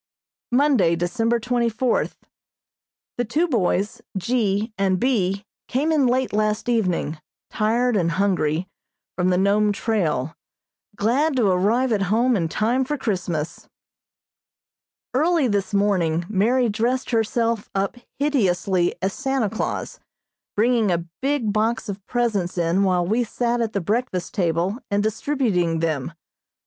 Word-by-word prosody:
Monday, 245 - +3
December 225 +7 0
twenty 240 0 0
fourth: 235 +2 -1 1.0
The - - +3
two 300 +10 0
boys, 205 - 0 0.2
G. 215 +1 0
and 190 -2 +1
B., 200 -5 0 0.2
came 285 +6 0
in 290 -5 +3
late 255 0 0
last 215 +1 0
evening, 180 -9 0 0.3
tired 230 +3 +1
and 170 -4 +1
hungry, 180 -3 0 0.5
from 180 0 +1
the 180 - +2
Nome 205 +2 +3
trail, 165 - -1 0.6
glad 265 +9 +1
to 245 -4 +2
arrive 225 +8 +2
at 210 -3 +1
home 240 +4 +3
in 165 -5 0
time 235 +9 +1
for 295 +3 -2
Christmas. 175 - -3 1.4
Early 310 +1 +2
this 200 -3 -1
morning 180 -5 +1
Mary 235 +6 +2
dressed 235 +5 -1
herself 230 -1 0
up 195 +2 0 0.2
hideously 195 -10 +1
as 190 0 0
Santa 265 -6 -1
Claus, 225 - -3 0.6
bringing 225 -1 +2
a 170 -1 0 0.2
big 270 -6 0
box 220 +2 0
of 200 0 -6
presents 215 -8 -1
in 170 +2 +2
while 180 -3 +2
we 225 +7 +1
sat 240 +1 -1
at 225 -1 -2
the 200 - -1
breakfast 200 -2 -2
table 180 +4 0
and 205 0 +1
distributing 215 - 0
them. 160 -3 -1
215 Hz, 135 wpm, -23 LUFS, 185-245 Hz, 1.4 s, Monday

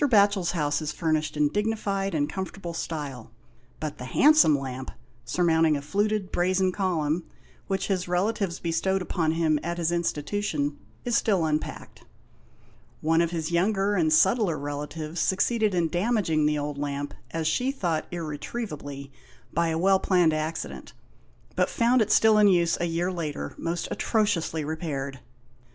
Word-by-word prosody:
Batohel's 200 -8 +3
house 150 -3 0
is 150 - -2
furnished 155 -2 -1
in 150 -1 +3
dignified 200 -1 -1
and 145 -1 +1
comfortable 190 -1 -5
style, 145 -8 -5 0.5
but 155 -1 -5
the 125 - -6
handsome 285 - +5
lamp, 130 -1 -5 0.4
surmounting 160 +2 +2
a - - -5
fluted 205 +4 0
brazen 185 +1 +2
column, 175 -4 0 0.4
which 195 -1 -1
his 185 -3 -1
relatives 185 0 0
bestowed 185 +3 0
upon 160 -4 0
him 160 -2 +2
at 170 +1 -3
his 170 -1 0
institution, 160 -2 -1 0.3
is 240 -1 +1
still 195 -8 +2
unpacked. 155 0 -4 1.0
One 165 +2 +3
of 170 - +1
his 165 -1 -3
younger 195 +3 +2
and 165 -5 +2
subtler 190 +1 +3
relatives 150 +3 -5
succeeded 215 +1 +1
in 170 -2 +2
damaging 175 -4 +1
the 150 0 +1
old 145 -1 -3
lamp, 145 0 -3 0.2
as 165 +3 -3
she 250 +12 +1
thought, 175 - -2
irretrievably, 150 -4 -5 0.4
by 170 +1 +2
a 160 0 0
well 190 +3 +4
planned 180 -4 +3
acci 155 +1 -2
dent, - - -10 0.6
but - - +2
found 240 +1 +3
it 215 -1 +1
still 220 -1 +5
in 210 - +6
use 170 -3 +3
a - - +2
year 170 +2 -1
later, 150 - -4
most 170 +1 -3
atrociously 190 -8 0
repaired. 145 -4 -4
170 Hz, 150 wpm, -26 LUFS, 150-195 Hz, 1.0 s, in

